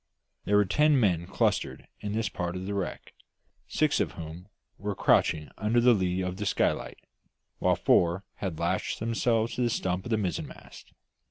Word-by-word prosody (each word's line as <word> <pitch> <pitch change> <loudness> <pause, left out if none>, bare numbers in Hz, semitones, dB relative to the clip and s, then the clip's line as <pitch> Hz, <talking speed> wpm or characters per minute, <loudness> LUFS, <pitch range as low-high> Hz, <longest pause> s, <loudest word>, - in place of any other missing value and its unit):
There 105 - +3
were 105 - +4
ten 150 +7 +3
men 90 -7 +1
clustered - - -1
in 105 0 -4
this 110 -1 0
part 90 -3 -3
of 90 0 -5
the 100 - -3
wreck, 100 -3 -4 0.5
six - - +1
of - - 0
whom 85 +3 -8 0.3
were 100 0 -3
crouching 75 -4 +2
under 110 +4 +2
the 120 +1 +6
lee 95 -3 0
of 90 0 -3
the 105 0 -2
skylight, - - 0 0.6
while - - +3
four 85 +3 +3
had 90 -5 -4
lashed 85 +1 -1
themselves 115 0 +1
to - - -3
the 120 - +2
stump 95 -5 -1
of - - -5
the 110 - +2
mizzenmast. 95 -5 -5
100 Hz, 175 wpm, -28 LUFS, 90-110 Hz, 0.6 s, the